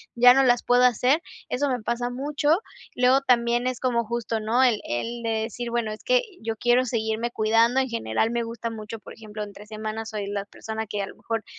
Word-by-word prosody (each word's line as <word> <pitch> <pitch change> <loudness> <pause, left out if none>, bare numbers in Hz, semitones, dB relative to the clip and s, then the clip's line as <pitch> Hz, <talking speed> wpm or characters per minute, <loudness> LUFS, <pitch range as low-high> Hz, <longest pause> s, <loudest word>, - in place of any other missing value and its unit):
ya 245 +1 +8
no 270 - +5
las 245 -1 +4
puedo 245 0 +4
hacer". 250 +6 +3 0.3
Eso 280 +2 0
me 250 -3 -1
pasa 240 +2 -2
mucho. 290 +5 +1 0.4
Luego 255 +2 +4
también 240 -1 +2
es 255 -2 -2
como 235 -3 0
justo, 230 -1 -2
¿no? 225 +4 +1
El 235 -5 +3
el 230 - -3
de 230 - -1
decir: 235 +1 -5
"Bueno, 235 -2 -1
es 215 - -8
que - - +3 0.2
yo 225 0 -3
quiero 245 +3 +3
seguirme 225 0 -1
cuidando". 230 +4 +3
En 260 -1 0
general, 225 - 0
me 235 0 0
gusta 230 0 -5
mucho, 220 0 -7
por - - -12
ejemplo, 215 -1 -7
entre 205 0 -10
semana 215 +1 -5
soy 210 -3 -4
la 200 0 -3
persona 220 +1 -6
que 205 -1 -3
a 195 - -3
lo - - -11
mejor, 225 -1 -3
235 Hz, 220 wpm, -25 LUFS, 220-250 Hz, 0.4 s, ya